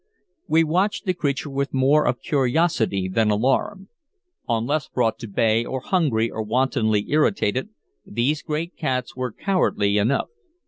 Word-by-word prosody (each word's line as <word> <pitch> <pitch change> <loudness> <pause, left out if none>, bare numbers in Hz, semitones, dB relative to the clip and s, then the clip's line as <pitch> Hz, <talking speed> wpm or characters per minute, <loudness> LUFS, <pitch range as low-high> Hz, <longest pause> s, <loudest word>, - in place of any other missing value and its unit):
We 165 +1 +4
watched 185 +8 0
the 185 - +1
creature 145 -3 -2
with 140 0 -2
more 140 +3 +3
of 120 +1 -1
curiosity 130 - +1
than 110 +3 +1
alarm. 135 - 0 0.6
Unless 120 +7 0
brought 120 -1 0
to 115 - -7
bay, 110 +2 +2
or 130 +2 -4
hungry, 130 -8 0
or 110 - -4
wantonly 110 -2 +1
irritated, 150 - +1 0.3
these 130 +8 -1
great 160 +2 -4
cats 130 -5 -2
were 125 -1 -3
cowardly 105 - +1
enough. 115 +7 +1
130 Hz, 140 wpm, -23 LUFS, 110-155 Hz, 0.6 s, We